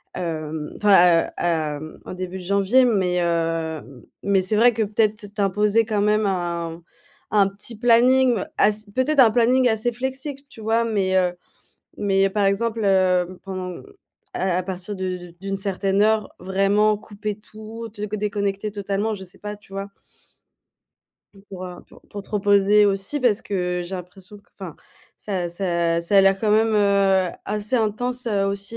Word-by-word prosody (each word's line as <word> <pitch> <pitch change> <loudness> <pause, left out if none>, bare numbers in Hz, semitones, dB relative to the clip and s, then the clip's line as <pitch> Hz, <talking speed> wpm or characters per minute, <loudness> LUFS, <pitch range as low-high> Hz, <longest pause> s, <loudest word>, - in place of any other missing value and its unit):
hem, 155 -3 -4
enfin, 180 -5 +5
heu, - - -10
hem, 155 -2 -2
en - - -8
début 185 0 -5
de - - -9
janvier. 200 +7 +3
Mais 185 -7 +1
heu 165 -1 -1
m 130 -4 -13 0.2
mais 200 -1 +2
c'est 185 +3 0
vrai 240 +3 +5
que 225 - -2
peut-être 215 0 0
t'imposer 210 +2 +2
quand 210 -2 -1
même 210 +1 +2
un 170 -3 -3 0.5
un 205 -2 +4
petit 205 +3 -6
planning, 245 +1 +4 0.2
ass 215 +1 +3
peut-être 275 +3 +1
un 245 -4 +8
planning 250 +3 +3
assez 220 +2 +1
flexible, 265 +3 -5
tu 225 - -13
vois, 225 +2 +1
mais, 195 -4 0
heu 180 -1 +2 0.6
mais 195 -1 +2
par 205 +1 0
exemple, 220 +3 0
heu, 185 -2 +2
pendant 185 -2 -6 0.5
à 185 -1 0
à - - -1
partir 190 +2 -5
de 180 -2 -5
d'une 195 0 -4
certaine 195 +1 0
heure, 215 -1 +1
vraiment 195 +3 +2
couper 210 0 -6
tout, 220 +2 -10
te 210 -1 -6
co 215 +1 -4
déconnecter 205 0 -2
totalement, 205 +2 -2
je 195 - -9
sais 180 - -11
pas, 210 0 -6
tu 205 -1 -21
vois? 195 +1 -5 1.5
Et 195 - -17
pour, 185 -1 -7
heu, 180 -1 -10
pour - - -18
pour 205 - -7
te - - -17
reposer 205 0 +4
aussi, 195 +8 -1
parce 235 -5 +2
que 180 -2 -2
j'ai 180 +2 -6
l'impression 185 +2 -10
q - - -23
enfin 185 -5 -8 0.4
ça 185 -4 -3
ça 170 -2 0
ça 170 +4 +1
a - - +9
l'air 195 0 +4
quand 215 0 0
même, 220 +2 +4
heu, 200 -2 +3 0.2
assez 210 +4 -1
intense, 245 +3 -1
heu, 200 -3 +1
aussi 200 +3 -3
200 Hz, 175 wpm, -22 LUFS, 185-215 Hz, 1.5 s, a